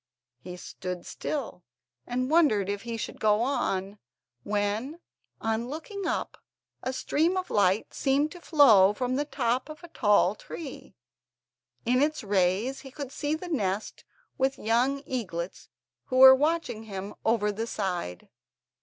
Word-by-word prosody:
He 180 0 -9
stood 180 0 -6
still, 255 - -5 0.4
and 255 +3 -1
wondered 250 - +4
if 205 0 -2
he 230 0 -5
should - - -6
go 210 0 +3
on, 200 -6 -1 0.4
when, 210 - -2 0.4
on 225 +2 -1
looking 360 +7 -5
up, - - -3 0.4
a 260 - -2
stream 320 +7 +1
of 370 - -3
light 200 +1 +2
seemed 280 +2 +1
to 355 - -11
flow 225 - +6
from 250 +3 -1
the 290 +2 0
top 255 -2 -1
of 310 +3 -10
a 345 - -10
tall 205 - +3
tree. 280 +6 -9 0.9
In 250 +3 +3
its 305 -2 0
rays 200 +6 +1
he 270 - -10
could 275 0 -7
see 290 +2 -1
the 355 +3 -7
nest 210 - -2 0.4
with 265 +1 +2
the - - -14
young 250 +6 +1
eaglets, 185 -10 -5 0.4
who 255 - -2
were 265 0 +11
watching 295 -5 0
him 200 -1 -6
over 220 -2 +2
the 225 +3 -4
side. 180 - -3
240 Hz, 150 wpm, -28 LUFS, 205-285 Hz, 0.9 s, were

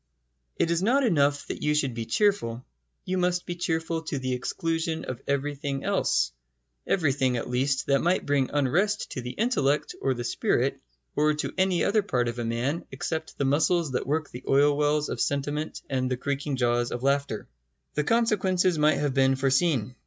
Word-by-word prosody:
It 165 - +1
is 170 +1 +1
not 255 +8 +3
enough 145 - +2
that - - -6
you 150 0 +1
should 135 -4 +1
be 115 -1 -5
cheerful: 125 - +1 0.4
you 185 0 -1
must 180 0 0
be 175 - -3
cheerful 165 -1 -1
to 145 - -2
the 130 -1 -2
exclusion 165 +5 -2
of 130 - -6
everything 140 0 -2
else - - +1 0.6
everything, 135 -7 +1
at 115 - -4
least, 135 +2 0
that 140 -1 +2
might 175 +2 +1
bring 140 -2 +1
unrest 175 +10 +1
to 130 - -4
the 125 - -6
intellect 150 - 0
or 135 -1 +1
the 120 - -4
spirit 120 - 0 0.4
or 150 0 +3
to 150 - -3
any 185 -2 +2
other 210 +2 +3
part 125 -12 0
of 120 +1 -4
a - - -1
man 120 +8 -1
except 160 -1 -4
the 140 - 0
muscles 155 +3 +2
that 125 - -2
work 155 +1 -1
the 125 +2 -9
oil 145 +1 +4
wells 150 0 +1
of - - -3
sentiment 145 +2 -2
and 130 -2 -1
the 125 - -1
creaking 140 +2 -2
jaws 120 -1 +1
of 120 - -4
laughter. 140 -5 0 0.5
The 150 - 0
consequences 190 -5 +2
might 150 +1 +4
have 145 -2 0
been 135 0 +3
foreseen. 135 -2 +1
145 Hz, 185 wpm, -27 LUFS, 130-165 Hz, 0.6 s, oil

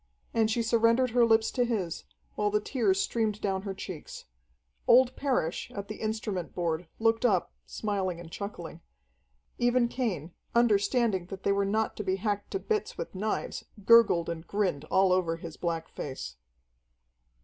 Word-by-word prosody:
And 220 -1 +3
she 230 +1 +1
surrendered 230 +2 +3
her 240 +1 +4
lips 225 -1 +3
to 250 - +1
his, 200 -8 -2 0.3
while 210 0 0
the 210 +1 +2
tears 210 -4 +1
streamed 215 -1 0
down 190 -2 -1
her 195 -1 -4
checks. 185 -5 -8 0.6
Old 255 +1 +6
Parrish, 250 - -1
at 200 -1 -6
the 215 - -5
instrument 215 -5 -3
board, 170 -1 -1
looked 225 +1 +2
up, 200 -8 +2
smiling 195 -5 -2
and 170 -1 -10
chuckling. 170 -4 -7 0.8
Even 240 0 +3
Cain, 195 - -3 0.2
understanding 215 -3 +2
that 195 +1 -8
they - - +2
were 200 0 +2
not 215 +2 0
to 210 - -3
be 190 -1 0
hacked 205 0 -2
to - - -1
bits 440 +3 -2
with - - -5
knives, 210 +3 -3 0.2
gurgled 230 -8 +6
and 170 -1 -5
grinned 185 -8 -1
all 190 +2 +3
over 175 -3 +1
his 165 -1 -8
black 165 -2 -2
face. 130 - -6
205 Hz, 160 wpm, -29 LUFS, 180-230 Hz, 0.8 s, Old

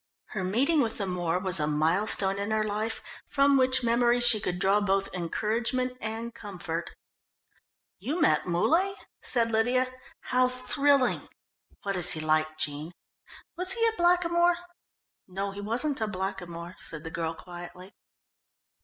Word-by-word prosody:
Her 190 - -4
meeting 270 - +1
with 225 -3 -2
the 200 - -2
Moor 180 -2 -2
was 185 -1 +2
a 150 - 0
milestone 190 +6 +2
in 200 +2 -3
her 220 0 0
life 215 +2 -3 0.2
from 280 0 +3
which 260 -1 +4
memory 240 +1 +2
she 240 -3 +9
could 180 -3 -3
draw 195 +3 +2
both 195 -1 -1
encouragement 230 +8 -1
and 225 +2 -5
comfort. 175 -6 -6 1.1
"You 305 +7 -3
met 300 - +2
Muley?" 330 - +1 0.3
said 230 -2 0
Lydia. 250 +3 +1 0.3
"How 255 0 +1
thrilling! 260 +1 +1 0.5
What 195 -1 -2
is 180 -3 +5
he 160 - -4
like, 155 0 0
Jean? 150 +2 -4 0.6
Was 365 +2 +3
he 460 -1 +1
a 450 -1 +1
blackamoor?" 345 -1 +2 0.7
"No, 195 +2 -4
he 200 +1 -8
wasn't 245 +6 0
a 220 - 0
blackamoor," 185 -3 -6
said 160 -1 -5
the 160 - -7
girl 165 0 -3
quietly. 180 +2 -11
210 Hz, 145 wpm, -27 LUFS, 180-255 Hz, 1.1 s, she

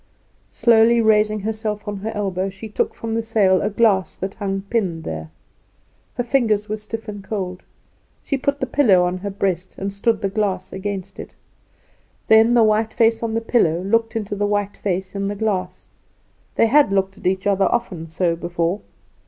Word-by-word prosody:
Slowly 235 0 +4
raising 215 -1 +3
herself 215 0 -3
on 205 -1 -3
her 215 +3 -4
elbow, 195 -2 -1
she 195 +3 -9
took 210 - -1
from 225 -1 -4
the 230 - 0
sail 210 -5 +2
a 205 - 0
glass 205 -3 +2
that 190 +1 -5
hung 195 -2 -3
pinned 195 -6 -2
there. 80 - -6 0.9
Her 245 - -1
fingers 225 -5 +1
were 215 0 -3
stiff 220 +1 -7
and 205 -2 -7
cold. 190 -3 -4 0.6
She 275 - -1
put 280 +1 -1
the 260 - 0
pillow 235 -9 +4
on 180 +1 -2
her 200 +2 -4
breast, 190 -2 -2
and 195 0 -4
stood 215 +2 0
the - - +2
glass 200 -1 -2
against 195 0 -5
it. - - -9 0.9
Then 225 +2 +6
the 235 - +6
white 215 +1 +1
face 230 0 +3
on 225 -1 -2
the 230 - 0
pillow 195 -8 +2
looked 225 +3 +1
into 210 -2 -3
the 205 0 0
white 205 -1 -1
face 190 -1 -3
in 200 0 -2
the 205 - -3
glass. 200 -3 -2 0.7
They - - +4
had 275 -1 +4
looked 195 0 0
at - - -3
each 190 0 0
other 200 -1 +3
often 185 -9 -2
so 170 +1 0
before. 170 +3 -2
205 Hz, 185 wpm, -21 LUFS, 190-225 Hz, 0.9 s, Then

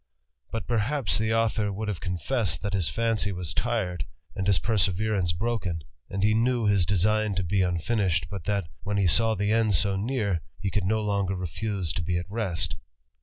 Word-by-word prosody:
But, 115 - -2
'erhaps, 120 -1 +1
the 110 0 +1
author 110 -2 +2
would 105 +2 -4
have 100 -5 -2
confessed, 90 - -1
that 100 -1 -2
his 95 -4 +1
fancy 115 -3 0
^ 90 -3 -4
tired, 95 - -1 0.3
and 95 - -2
his 100 -2 +5
perseverance 100 -3 +1
broken; 95 -3 -2 0.3
and 95 +1 -2
he 105 +1 +4
knew 120 +1 +2
his 100 -4 +3
esign 105 +2 +2
to 95 - 0
be 95 +3 +1
unfinished, 90 0 +1
but 95 -5 -5
that, 100 -4 0
when 105 0 -1
he 100 - +3
saw 110 +5 +3
the 105 +1 0
end 110 -3 +3
so 100 +3 +2
Car, 100 -4 0 0.2
he 100 - -2
could 100 -3 0
no 110 +3 +2
longer 100 -2 0
refuse 90 -1 -2
to 90 - -2
be 90 +1 0
at 85 - -2
rest. 90 -6 -2
100 Hz, 190 wpm, -27 LUFS, 90-110 Hz, 0.3 s, his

